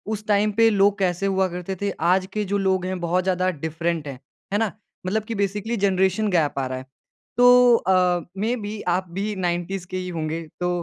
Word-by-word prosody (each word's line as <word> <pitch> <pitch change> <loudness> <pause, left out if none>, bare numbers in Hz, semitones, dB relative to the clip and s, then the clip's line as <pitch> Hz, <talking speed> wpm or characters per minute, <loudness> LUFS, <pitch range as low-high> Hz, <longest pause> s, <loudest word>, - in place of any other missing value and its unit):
उस 210 - -10
टाइम 210 0 +3
पे 225 0 +7
लोग 200 0 +3
कैसे 180 0 0
हुआ 190 -1 +2
करते 180 +2 -4
थे, 200 - 0
आज 185 +2 +1
के 215 - -1
जो 205 - +2
लोग 190 -2 +1
हैं 185 0 -3
बहुत 175 +1 0
ज़्यादा 185 0 +1 0.2
डिफ़रेंट 160 -1 -2
हैं। 135 -3 -7 0.3
है - - +3
ना? 225 -3 0 0.3
मतलब 210 +3 0
कि 225 +1 -5
बेसिकली 210 +4 -2
जनरेशन 190 +2 +2
गैप 150 -4 0
आ 135 - -1
रहा 130 0 -4
है। 130 - -8 0.5
तो 245 0 +7
अ, 180 -3 +2 0.3
मेबी 215 -3 -3 0.2
आप 185 -1 -6
भी 210 +1 -2
90s 175 +2 -3
के 185 - -4
ही 180 0 -4
होंगे 155 +1 -3 0.2
तो 180 0 0
190 Hz, 205 wpm, -23 LUFS, 175-210 Hz, 0.5 s, पे